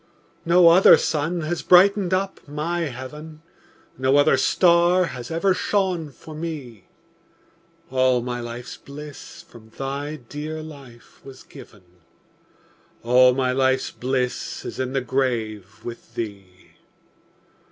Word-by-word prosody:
No 170 0 +6
other 180 +3 +7
sun 160 +3 -1
has 165 +2 -3
brightened 190 +1 +5
up 190 +1 -1
my 165 +4 -2
heaven, 150 +4 -9 0.6
No 130 +2 +3
other 145 -1 +5
star 175 +5 +3
has 125 -5 -7
ever 175 +4 +1
shone 185 -5 -1
for 155 +3 -13
me; 150 - -7 1.0
All 130 -2 +2
my 120 0 -4
life's 120 +1 -7
bliss 145 +1 -11
from 110 -2 -16
thy 140 +5 -5
dear 150 +4 -7
life 135 -6 -14
was 135 -1 -12
given, 105 -4 -15 1.2
All 125 +1 +5
my 130 -1 +1
life's 130 0 +1
bliss 125 0 -3
is - - -7
in 130 0 -2
the 135 - 0
grave 110 -6 -3
with 120 0 -9
thee. 100 -4 -5
135 Hz, 120 wpm, -23 LUFS, 125-165 Hz, 1.2 s, other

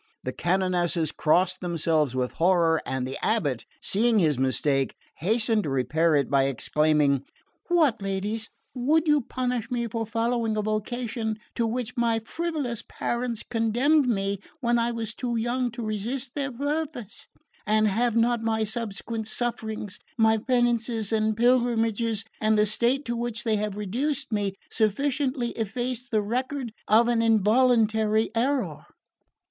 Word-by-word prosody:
The - - -3
canonesses 175 -2 0
crossed 180 +4 +2
themselves 160 -6 0
with 125 -1 -1
horror, 170 -2 +4
and 130 -1 -2
the 130 - -5
abate, 145 - 0 0.2
seeing 225 +3 +2
his 155 -9 +2
mistake, 135 +1 +1 0.2
hastened 220 - +1
to - - -2
repair 150 +5 +2
it 140 -2 +2
by 135 -1 +3
exclaiming 145 +1 +2 0.4
"What, 315 -11 +3
ladies, 200 +3 -2 0.2
would 295 +6 +2
you 300 -1 +4
punish 250 -2 -3
me 240 -1 -1
for 225 0 -3
following 230 0 0
a 210 - 0
vocation 220 +1 -2 0.2
to 230 - 0
which 250 +2 -3
my 230 -1 +2
frivolous 280 0 -3
parents 240 -1 -3
condemned 250 +5 +2
me 200 -3 0 0.2
when 240 -3 +2
I 235 0 +1
was 230 -1 -4
too 240 0 -3
young 240 +2 0
to 235 -2 -5
resist 235 +5 -3
their 275 -2 -2
purpose? 285 -3 -4 0.4
And 215 0 +3
have 230 +3 +1
not 235 0 +2
my 220 -1 0
subsequent 220 0 -4
sufferings, 220 -3 -3 0.2
my 220 -1 +4
penances 235 -2 0
and 215 -1 +1
pilgrimages, 230 -2 +2 0.2
and 215 0 +3
the 210 - +4
state 240 +6 +1
to 235 - -2
which 235 -2 -3
they 220 -2 +1
have 205 -1 -3
reduced 255 +8 -2
me, 205 -2 -1 0.2
sufficiently 255 +3 0
effaced 245 +3 -3
the 215 -2 +1
record 255 +2 -3
of 225 +3 +5
an 235 -1 +2
involuntary 220 -1 +3
error?" 265 +4 -1
225 Hz, 145 wpm, -26 LUFS, 200-245 Hz, 0.4 s, of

